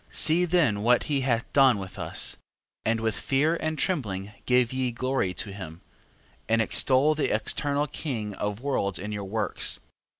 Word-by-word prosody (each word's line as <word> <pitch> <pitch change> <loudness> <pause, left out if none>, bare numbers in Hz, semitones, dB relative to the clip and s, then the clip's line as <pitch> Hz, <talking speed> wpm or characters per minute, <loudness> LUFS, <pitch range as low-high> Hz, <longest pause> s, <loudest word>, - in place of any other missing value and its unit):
13:6. - - -16
See 165 +3 +5
then 155 - +2
what 120 +2 +4
he 140 -2 0
hath 120 -3 -1
done 135 -5 +6
with 95 -1 -7
us, - - -2 0.5
and 115 0 +1
with 110 -1 0
fear 150 +5 +1
and 155 -1 -2
trembling 105 - -1 0.2
give 125 -1 +3
ye 130 -1 0
glory 130 -4 -1
to 105 - -4
him: 85 -4 -8 0.7
and 115 0 +3
extol 130 +6 +3
the 155 - 0
eternal 145 0 0
King 115 -8 -4
of 105 +1 -3
worlds 115 -9 0
in 105 +3 -5
your 100 -1 -4
works. 100 0 -1
125 Hz, 170 wpm, -27 LUFS, 105-140 Hz, 0.7 s, done